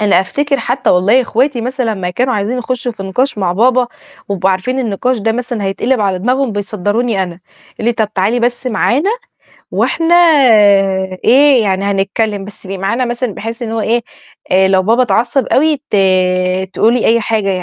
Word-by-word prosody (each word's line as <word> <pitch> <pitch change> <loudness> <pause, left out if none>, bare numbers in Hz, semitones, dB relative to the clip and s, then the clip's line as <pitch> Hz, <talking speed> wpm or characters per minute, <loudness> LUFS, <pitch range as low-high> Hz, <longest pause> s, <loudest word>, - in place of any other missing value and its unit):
أنا 205 -3 +3
أفتكر 280 +8 -1
حتى 245 +2 -1
والله 200 +8 +3
أخواتي 250 +2 0
مثلًا 255 -1 -2
لمّا 180 -2 -4
كانوا 250 +6 -1
عايزين 215 +5 -2
يخشوا 250 0 -3
في 200 - -9
نقاش 210 +5 -1
مع 180 -3 0
بابا، 245 +5 +2 0.4
و 200 - -1
يبقوا 190 +1 +1
عارفين 220 +8 -2
النقاش 250 +1 -1
ده 225 +1 0
مثلًا 240 -2 -4
هيتقلب 220 +5 -1
على 195 -2 0
دماغهم، 250 +4 0
بيصدروني 205 +1 -1
أنا 175 -1 -7 0.3
يقولوا - - -8
لي: - - -1
"طب 215 -2 -2
تعالي 205 +6 0
بس 240 +2 -1
معانا 255 - +1 0.6
وإحنا 335 +1 +1 1.1
إيه، 270 -1 +5
يعني 195 -1 -1
هنتكلم، 200 +1 -1
بس 205 +1 -12
تبقي 195 -1 -6
معانا 230 +7 -1
مثلًا 240 -2 -3
بحيث 230 +3 -6
اللي 225 -1 -4
هو 225 - -1
إيه؟ 235 +2 0 0.5
آآ 190 +1 +4
لو 190 -1 +3
بابا 230 +6 +2
اتعصب 240 +4 0
أوي، 305 +2 +2
ت - - +1 0.8
تقولي 235 +2 +2
أي 230 +1 +3
حاجة 215 -2 -1
225 Hz, 175 wpm, -14 LUFS, 195-250 Hz, 1.1 s, إيه